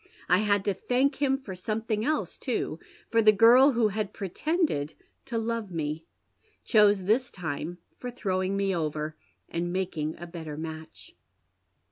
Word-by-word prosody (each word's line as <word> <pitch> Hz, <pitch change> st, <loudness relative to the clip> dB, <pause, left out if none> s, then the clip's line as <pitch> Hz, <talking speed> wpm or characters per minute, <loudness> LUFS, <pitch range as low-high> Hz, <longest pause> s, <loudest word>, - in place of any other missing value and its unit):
I 180 Hz, +1 st, +4 dB
had 205 Hz, -2 st, +2 dB
to 200 Hz, -, +2 dB
thank 265 Hz, +8 st, 0 dB
him 270 Hz, -1 st, +3 dB
for 245 Hz, -8 st, -8 dB
something 215 Hz, +3 st, -2 dB
else 305 Hz, +4 st, -1 dB
too, -, -, -2 dB, 0.3 s
for 230 Hz, -, +4 dB
the 215 Hz, -1 st, +7 dB
girl 240 Hz, +6 st, +7 dB
who 230 Hz, -2 st, +3 dB
had 210 Hz, 0 st, -3 dB
pretended 195 Hz, -, -1 dB, 0.3 s
to 240 Hz, -4 st, -3 dB
love 225 Hz, -2 st, -2 dB
me 160 Hz, -2 st, -3 dB, 0.6 s
chose 210 Hz, -3 st, +4 dB
this 230 Hz, +7 st, +2 dB
time 165 Hz, -1 st, -5 dB, 0.2 s
for 250 Hz, -, -5 dB
throwing 190 Hz, -5 st, -1 dB
me 195 Hz, -1 st, +1 dB
over, 155 Hz, -1 st, -2 dB, 0.3 s
and 170 Hz, +1 st, -3 dB
making 170 Hz, -5 st, -2 dB
a 175 Hz, -, -7 dB
better 160 Hz, -3 st, -7 dB
match." 160 Hz, 0 st, -8 dB
200 Hz, 150 wpm, -28 LUFS, 170-230 Hz, 0.6 s, the